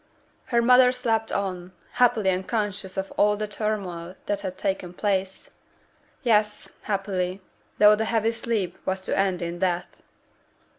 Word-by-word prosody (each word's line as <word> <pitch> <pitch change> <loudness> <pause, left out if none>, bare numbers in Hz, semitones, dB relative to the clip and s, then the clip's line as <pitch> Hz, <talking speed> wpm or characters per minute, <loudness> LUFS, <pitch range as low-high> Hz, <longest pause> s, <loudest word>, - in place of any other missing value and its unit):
Her 235 -2 +2
mother 250 +1 +6
slept 225 -3 0
on, 185 -2 -3 0.2
happily 235 -6 +3
unconscious 190 0 -2
of 190 0 -3
all 210 0 +4
the 215 0 -3
turmoil 195 -5 -3
that 205 -1 -1
had 185 -2 -5
taken 190 -3 -3
place; 190 -1 -2 0.7
yes, 210 -3 +1
happily, 195 -2 -2 0.4
though 210 0 +7
the 220 +1 -1
heavy 225 0 +1
sleep 225 -5 -2
was 190 0 -1
to - - -2
end 190 -2 +1
in 170 +1 -4
death. 180 -1 -2
200 Hz, 140 wpm, -25 LUFS, 185-220 Hz, 0.7 s, though